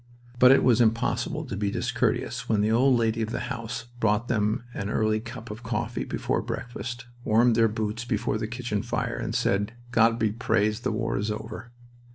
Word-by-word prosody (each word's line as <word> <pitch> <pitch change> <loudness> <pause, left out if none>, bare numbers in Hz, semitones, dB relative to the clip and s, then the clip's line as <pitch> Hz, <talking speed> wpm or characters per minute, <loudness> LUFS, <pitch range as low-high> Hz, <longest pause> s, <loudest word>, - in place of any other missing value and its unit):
But 125 - +8
it 135 - +5
was 125 -2 +4
impossible 115 0 +1
to - - -5
be 100 0 -1
discourteous - - -1
when 110 -2 +3
the 105 +1 +2
old 125 +2 +4
lady 115 0 +1
of 110 - -1
the - - -2
house 115 -1 -5
brought 110 +1 +1
them 110 -1 +1
an 100 -2 -4
early 110 0 +1
cup 110 0 -8
of 110 +3 -8
coffee 115 -2 -2
before - - -1
breakfast, 120 0 -5 0.2
warmed 115 +2 +4
their 115 0 +5
boots 110 +1 -3
before 110 -2 -1
the 110 - -2
kitchen 115 -3 -3
fire, - - -2
said, 105 +3 +1 0.2
"God 115 0 +4
be 110 -2 +1
praised, 110 -1 +1
the - - 0
war 115 0 -1
is 105 +2 -2
over." 110 +2 -6
115 Hz, 190 wpm, -26 LUFS, 110-120 Hz, 0.2 s, But